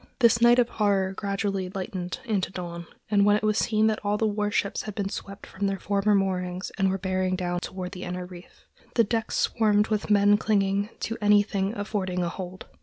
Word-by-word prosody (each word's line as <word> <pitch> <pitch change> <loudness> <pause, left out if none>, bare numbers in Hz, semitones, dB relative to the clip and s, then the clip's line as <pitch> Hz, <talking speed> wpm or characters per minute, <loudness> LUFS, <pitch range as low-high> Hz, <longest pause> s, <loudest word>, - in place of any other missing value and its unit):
This 235 -2 +4
night 240 +1 +6
of 245 -2 +4
horror 200 -4 +1
gradually 195 -1 -2
lightened 185 -2 -5
into 205 -6 -1
dawn, 170 -2 -6 0.2
when 205 0 +4
it 215 - -1
was 215 0 +2
seen 215 -1 +2
that 220 -1 0
all 205 0 +1
the 220 - +1
war 210 -1 0
ships 200 -1 -1
had 210 -2 -7
been 200 -2 -2
swept 200 0 -7
from 200 +1 -3
their 195 0 -1
former 200 +2 +1
moorings 185 -1 -1
and 195 0 +3
were 190 - 0
bearing 185 -1 -1
down 175 -1 -2
toward 185 0 -6
the 180 - -8
inner 180 0 -4
reef. 180 0 -14 0.3
The 230 - +5
decks 225 +1 -1
swarmed 210 -2 +2
with 215 -1 -1
men 205 0 +5
clinging 200 -1 +1
to 230 - -3
anything 205 0 +2
affording 190 -3 -2
a 170 - -1
hold. 185 +1 -7
200 Hz, 200 wpm, -26 LUFS, 185-210 Hz, 0.3 s, night